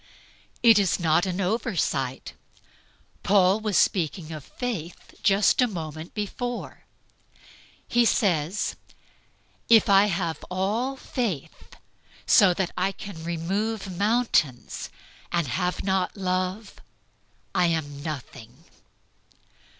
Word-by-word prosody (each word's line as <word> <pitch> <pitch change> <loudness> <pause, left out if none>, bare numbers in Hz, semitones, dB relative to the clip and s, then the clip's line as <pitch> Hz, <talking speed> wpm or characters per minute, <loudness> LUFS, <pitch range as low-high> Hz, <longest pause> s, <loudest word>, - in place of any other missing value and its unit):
It 225 -3 +7
is 195 -2 +1
not 170 +2 +2
an 180 0 -3
oversight. 180 - -1 0.9
Paul 195 0 +4
was 215 -3 0
speaking 165 -2 +1
of 155 -3 -7
faith 195 - -6
just 200 +4 +4
a 250 - +4
moment 160 -5 -7
before. 240 +4 -5 1.0
He 240 0 +3
says, 190 - +1 0.9
"If 225 -3 +6
I 195 +1 +6
have 170 -5 -2
all 210 +9 -1
faith, 190 - -4 0.5
so 200 -5 +6
that 185 -1 -1
I 185 +2 0
can 195 -4 -9
remove 190 +4 -2
mountains, 205 - 0 0.4
and 170 -2 +1
have 180 +8 -2
not 190 0 0
love, 185 +2 -2 0.7
I 180 -1 +3
am 145 -4 -2
nothing." 135 -3 -8
185 Hz, 105 wpm, -25 LUFS, 165-210 Hz, 1.0 s, It